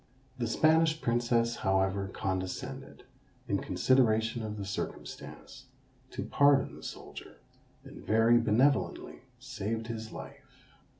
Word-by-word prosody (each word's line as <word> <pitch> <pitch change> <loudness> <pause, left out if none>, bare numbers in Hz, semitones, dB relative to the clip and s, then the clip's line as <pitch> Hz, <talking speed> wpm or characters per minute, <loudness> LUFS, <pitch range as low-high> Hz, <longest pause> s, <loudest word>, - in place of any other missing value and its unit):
The 120 - 0
Spanish 160 +5 +3
Princess 120 -1 +1
however 95 0 +1
condescended, 95 -2 -5 0.4
in - - 0
consideration 115 -3 +2
of 105 -1 -5
the 100 - -5
circumstance, 95 - -7 0.4
to - - -5
pardon 140 -1 +3
the - - -12
soldier, 60 - -9 0.5
and - - -12
very 115 +2 +4
benevolently 125 +5 +1 0.2
saved 115 -3 -4
his 110 -1 -6
life. - - -12
115 Hz, 110 wpm, -30 LUFS, 105-130 Hz, 0.5 s, very